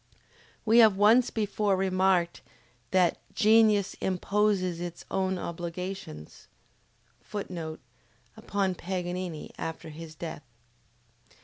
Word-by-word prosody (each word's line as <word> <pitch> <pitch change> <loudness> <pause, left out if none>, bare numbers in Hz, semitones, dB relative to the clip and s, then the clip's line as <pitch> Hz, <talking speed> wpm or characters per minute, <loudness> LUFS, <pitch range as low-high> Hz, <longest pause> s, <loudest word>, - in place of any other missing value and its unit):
We 225 +2 +6
have 215 -4 +7
once 225 +5 +5
before 210 -2 0
remarked 185 -2 +1 0.5
that 180 -2 +3 0.2
"genius 215 -2 +4
imposes 190 -2 +1
its 175 -1 -6
own 190 -1 0
obligations." 170 - -6 0.7
[Footnote: 170 -6 -6 0.6
Upon 195 -2 -1
Paganini, 180 -2 -4
after 160 0 -5
his 155 0 -9
death. 160 -2 -6
185 Hz, 90 wpm, -28 LUFS, 170-205 Hz, 0.7 s, have